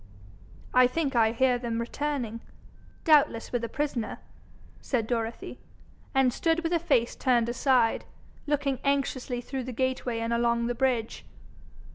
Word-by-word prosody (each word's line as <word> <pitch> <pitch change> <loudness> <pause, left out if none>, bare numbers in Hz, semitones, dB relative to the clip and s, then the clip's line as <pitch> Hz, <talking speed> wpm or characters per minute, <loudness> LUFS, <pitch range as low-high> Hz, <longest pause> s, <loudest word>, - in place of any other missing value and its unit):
'I 255 0 +6
think 280 0 -2
I 225 -2 +4
hear 250 +1 +2
them 235 -2 -3
returning, 240 -2 -3 0.6
doubtless 290 -8 +3
with 245 -1 -1
a 230 - -2
prisoner,' 280 -7 -2 0.6
said 240 -5 -1
Dorothy, 230 -1 -3 0.6
and 265 -2 +4
stood 330 +3 +1
with 330 - -1
her 340 - +2
face 280 -8 +1
turned 240 -3 +2
aside, 245 -1 +2 0.4
looking 285 -2 0
anxiously 270 -3 -1
through 260 +1 -5
the 255 - -5
gateway 255 -1 -1
and 230 +1 -1
along 235 0 +1
the 245 - 0
bridge. 240 -3 -1
250 Hz, 140 wpm, -28 LUFS, 235-275 Hz, 0.6 s, I